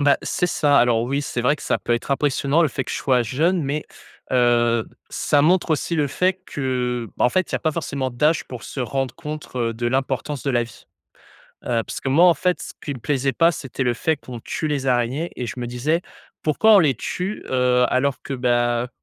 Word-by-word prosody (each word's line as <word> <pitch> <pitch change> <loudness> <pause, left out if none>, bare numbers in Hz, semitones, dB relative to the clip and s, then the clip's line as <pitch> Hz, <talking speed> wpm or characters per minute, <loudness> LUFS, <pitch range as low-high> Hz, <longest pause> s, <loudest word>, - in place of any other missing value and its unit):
Bah, 145 -1 +4
c'est 180 - 0
ça. 145 -4 +3
Alors 120 -2 +3
oui, 135 +4 -1
c'est 125 -4 -3
vrai 135 +4 +3
que - - -12
ça - - 0
peut 120 - -2
être 120 +4 -2
impressionnant, 140 +2 +2
le 160 - +3
fait 135 +1 -3
que - - -7
je - - -2
sois 125 -3 +2
jeune 160 - +1
mais 145 +2 -2 0.5
heu, 120 -2 +3 0.2
ça 145 -1 +2
montre 175 +1 +3
aussi 160 +2 0
le 150 -2 +2
fait 185 +6 0
que, 125 -3 -2
bah, - - +3
en - - +4
fait, 185 +7 0
il - - 0
y - - +3
a - - -3
pas 155 - 0
forcément 140 -5 -3
d'âge 150 +6 +1
pour 125 -4 -9
se 135 - -6
rendre 135 +1 -2
compte 130 -6 -4
de 120 +1 -3
l'importance 135 +2 -1
de 140 - 0
la 120 -2 +2
vie. 115 -3 -12 0.8
Heu, 115 -2 0
parce - - -6
que - - -3
moi, 155 +7 +5
en 175 - +6
fait, 180 -4 0
ce - - -7
qui 145 - -4
me - - -8
plaisait 135 +2 0
pas, 170 +1 +4
c'était 135 -4 -5
le 125 -1 +2
fait 160 +6 0
qu'on 125 -4 -9
tue 155 - -3
les 140 -3 -2
araignées 130 +6 0
et 125 - -3
je 120 +2 -6
me 120 - -3
disais: 130 +8 0 0.4
«Pourquoi 215 +9 +4
on - - +8
les 150 -7 +4
tue? 180 - -4
Heu, 125 -1 +3
alors 130 +1 0
que, - - -6
bah, 120 -1 +1
heu, - - -8
135 Hz, 235 wpm, -22 LUFS, 125-150 Hz, 0.8 s, on